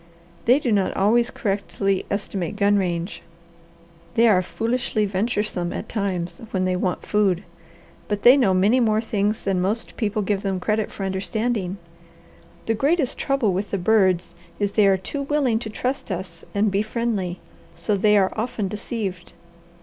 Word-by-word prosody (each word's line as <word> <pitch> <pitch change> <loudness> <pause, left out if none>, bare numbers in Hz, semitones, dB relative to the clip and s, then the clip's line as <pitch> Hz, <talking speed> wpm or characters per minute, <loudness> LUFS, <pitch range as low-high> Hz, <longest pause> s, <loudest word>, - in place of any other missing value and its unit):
They 245 +3 +6
do 265 -5 -1
not 200 -3 +1
always 235 +5 +3
correctly 195 -1 -1
estimate 200 -2 -3
gun 205 0 +3
range, 175 -1 -1 0.9
they 235 +1 +5
are 190 -5 +5
foolishly 225 +2 -1
venturesome 200 -3 -1
at - - -5
times 190 -5 -2
when 185 -1 0
they 185 0 +1
want 180 0 -2
food, 200 -3 +1 0.6
but 205 -1 -2
they 245 +2 +9
know 250 -9 +3
many 205 +7 +4
more 215 -3 +3
things 215 -1 -1
than 190 -2 0
most 210 +5 -2
people 215 -2 -1
give 195 0 0
them 195 -2 -1
credit 215 +3 0
for 195 - -5
understanding. 195 +1 -2 0.9
The 225 - +1
greatest 280 +4 +1
trouble 275 -8 +1
with 195 +3 -2
the 200 - -1
birds 185 -2 +2 0.2
is 205 -1 0
they 205 -1 +4
are 195 -1 +4
too 280 +10 -5
willing 275 -5 +1
to 225 - -6
trust 255 +5 -3
us 175 -2 -5
and 205 +1 +2
be 195 +1 +2
friendly, 215 -5 -2 0.4
so 170 +5 0
they 210 +1 +4
are 190 -1 +2
often 220 -2 -2
deceived." 205 -3 -5
205 Hz, 165 wpm, -23 LUFS, 190-225 Hz, 0.9 s, they